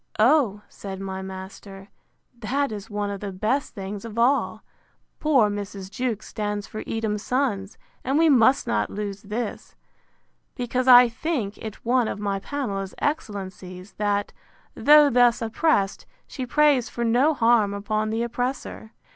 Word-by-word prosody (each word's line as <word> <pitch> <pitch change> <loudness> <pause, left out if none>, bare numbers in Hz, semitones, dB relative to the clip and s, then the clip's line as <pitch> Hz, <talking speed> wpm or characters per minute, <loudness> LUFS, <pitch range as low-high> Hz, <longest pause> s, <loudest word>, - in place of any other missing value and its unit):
O, 225 -4 +3
said 195 -1 -8
my 190 -1 -5
master, 190 +1 -9 0.5
that 270 +5 -1
is 210 +1 -7
one 205 -1 -2
of 200 - -5
the 200 0 -5
best 220 +9 -1
things 195 0 -6
of 230 -1 -8
all. 255 +4 +1 0.6
Poor 275 -8 +4
Mrs. 200 -2 -6
Jewkes 230 -1 -3
stands 210 -2 -3
for 215 - -7
Edom's 220 -2 -2
Sons; 215 -6 -1 0.3
and 270 +3 0
we 325 +1 +5
must 260 -2 +4
not 105 -1 0
lose 200 -1 -5
this, 215 +2 -5 0.8
because 250 +1 -2
I 250 -1 +9
think 230 -4 -3
it 220 0 -9
one 245 -1 +2
of - - -3
my 200 -1 -2
Pamela's 195 -6 -4
excellencies, 190 - -4
that, 205 -1 0 0.4
though 295 -1 +6
thus 245 -1 +4
oppressed, 225 -3 0 0.2
she 255 -3 -6
prays 285 -2 +3
for 235 - -4
no 255 +7 +3
harm 230 -4 +3
upon 215 +2 -2
the 225 +2 -1
oppressor. 245 -2 -4
215 Hz, 145 wpm, -24 LUFS, 200-250 Hz, 0.8 s, I